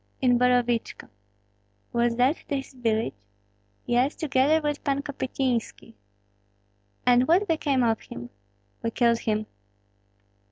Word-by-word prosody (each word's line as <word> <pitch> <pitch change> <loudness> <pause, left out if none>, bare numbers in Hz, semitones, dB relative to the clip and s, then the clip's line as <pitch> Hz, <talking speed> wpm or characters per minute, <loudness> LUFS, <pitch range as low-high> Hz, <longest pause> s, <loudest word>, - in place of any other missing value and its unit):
"In 245 -2 +3
Borovichko." 245 -2 +1 0.8
"Was 235 0 +1
that 255 +5 +3
his 275 -2 -3
village?" 225 - -1 0.7
"Yes, 250 +4 +1
together 290 +1 +2
with 295 -1 -3
Pan 280 -1 0
Kopystynski." 260 -5 -3 1.1
"And 250 +1 +4
what 370 +5 +3
became 290 -6 +1
of 225 -2 +1
him?" 120 0 -9 0.5
"We 230 - -1
killed 235 0 +2
him." 215 -1 -1
250 Hz, 110 wpm, -26 LUFS, 235-280 Hz, 1.1 s, And